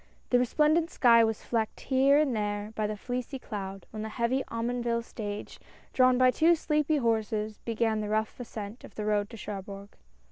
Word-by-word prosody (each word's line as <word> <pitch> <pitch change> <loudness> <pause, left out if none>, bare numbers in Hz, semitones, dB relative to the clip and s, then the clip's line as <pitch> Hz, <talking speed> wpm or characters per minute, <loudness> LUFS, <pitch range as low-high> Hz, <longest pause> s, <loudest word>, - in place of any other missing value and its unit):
The 245 - +5
resplendent 305 +6 +2
sky 235 -6 +5
was 220 -1 -1
flecked 225 -2 -2
here 270 +1 +4
and 295 -5 +2
there 210 0 -2
by 215 -1 -1
a 210 0 -2
fleecy 250 +5 -4
cloud, 195 -5 -6
when 215 - -6
the 220 - -4
heavy 235 +4 0
Omonville 235 0 -1
stage, 210 -3 -6 0.3
drawn 255 -1 +5
by 255 0 +5
two 330 +6 +4
sleepy 300 -1 +1
horses, 220 -3 -1
began 225 -1 0
the 210 - -4
rough 215 +2 -1
ascent 220 -1 -7
of - - -13
the 210 - -4
road 205 -1 +1
to 230 - -10
Cherbourg. 200 0 -7
230 Hz, 180 wpm, -29 LUFS, 210-255 Hz, 0.3 s, The